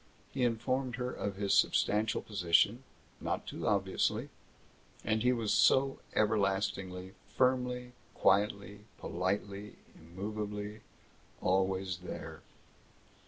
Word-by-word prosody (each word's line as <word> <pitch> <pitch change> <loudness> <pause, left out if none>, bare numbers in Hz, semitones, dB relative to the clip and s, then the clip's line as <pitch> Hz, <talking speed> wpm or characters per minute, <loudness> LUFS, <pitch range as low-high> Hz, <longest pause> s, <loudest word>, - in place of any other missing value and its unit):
He 130 - 0
informed 125 +2 0
her 125 0 -2
of 100 -1 -3
his 100 0 0
substantial 110 +1 +2
position 100 +5 +2 0.4
not - - -2
too - - -4
obviously. - - +1 0.8
And 110 0 +1
he 125 +2 +4
was 115 -4 0
so 135 0 +4 0.2
everlastingly, 95 -3 0 0.2
firmly, 125 -1 +1 0.2
quietly, 100 +1 +1
politely, 100 +2 -3 0.2
immovably 105 +4 -5 0.6
always 95 -1 +1
there. 90 0 -7
105 Hz, 95 wpm, -33 LUFS, 95-120 Hz, 0.8 s, he